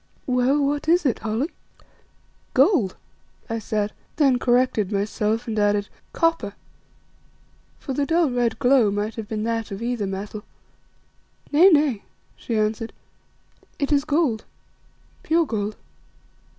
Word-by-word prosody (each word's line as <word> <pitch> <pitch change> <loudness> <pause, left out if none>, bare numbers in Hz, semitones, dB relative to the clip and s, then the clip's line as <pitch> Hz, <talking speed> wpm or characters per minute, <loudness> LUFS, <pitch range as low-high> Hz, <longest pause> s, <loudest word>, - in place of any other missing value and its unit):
"Well, 260 +3 +2
what 290 +2 -1
is 345 0 +4
it, 255 - +1
Holly?" 225 +9 -2 1.0
"Gold," 235 - +3 0.6
I 230 - -1
said, 210 -1 -2 0.2
then 270 -5 +3
corrected 245 -5 +2
myself 215 +3 -1
and 220 -2 -1
added, 205 0 +1 0.2
"Copper," 330 - 0 1.2
for 270 - -5
the 280 +1 -1
dull, 330 -4 +2
red 240 -2 0
glow 245 -3 +4
might 205 +2 -2
have 220 -2 -6
been 215 -1 -3
that 225 -1 -2
of 200 +2 -6
either 235 -4 -1
metal. 205 +2 -5 1.1
"Nay, 320 +6 +7
nay," 290 - +3 0.3
she 230 - -3
answered, 215 +2 -1 0.8
"it 280 0 -1
is 285 -1 +3
gold, 290 -7 +1 0.8
pure 330 +1 +2
gold." 215 -4 -3
230 Hz, 125 wpm, -23 LUFS, 215-280 Hz, 1.2 s, Nay